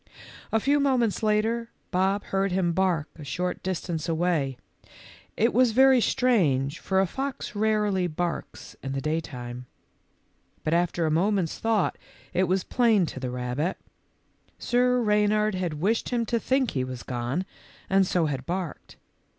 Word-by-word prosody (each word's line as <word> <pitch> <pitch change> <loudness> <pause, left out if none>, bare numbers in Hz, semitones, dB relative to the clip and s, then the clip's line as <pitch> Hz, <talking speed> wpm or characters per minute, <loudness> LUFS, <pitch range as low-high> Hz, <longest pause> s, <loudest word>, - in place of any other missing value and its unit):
A 225 - +3
few 285 +5 +2
moments 255 -6 +1
later, 220 +2 +1 0.2
Bob 195 +2 +1
heard 195 0 0
him 180 -2 +1
bark 175 -4 +1
a - - -7
short 180 +7 -3
distance 175 -3 -3
away. 160 -6 0 0.8
It 230 - +4
w - - +2
r - - +8
as 250 -3 +4
very 265 +1 +6
strange, 160 - +2
for 190 -1 0
a 190 - +4
fox 270 +7 -4
rarely 210 -3 +1
barks 175 +1 -4
in 135 0 -4
the 135 - -1
daytime. 125 -5 -4 1.0
But 155 - 0
after 175 -1 +1
a 155 - +1
moment's 180 +1 +1
thought 225 -4 +1 0.3
it 185 +1 +2
was 185 +1 +1
plain 225 -7 +3
to 135 - -6
the 130 -1 -3
rabbit. 125 +7 -2 0.8
Sir 250 +1 +2
Rey 210 -2 +3
nard 215 0 +2
had 180 -4 -2
wished 200 +9 0
him 235 -2 0
to 235 +1 0
think 260 +1 +1
he 135 - -2
had 130 -1 -4
gone, 125 +8 -2 0.4
and 195 -1 +3
so 175 -3 +1
had 135 -4 -3
barked. 175 -3 -4
185 Hz, 160 wpm, -26 LUFS, 155-220 Hz, 1.0 s, r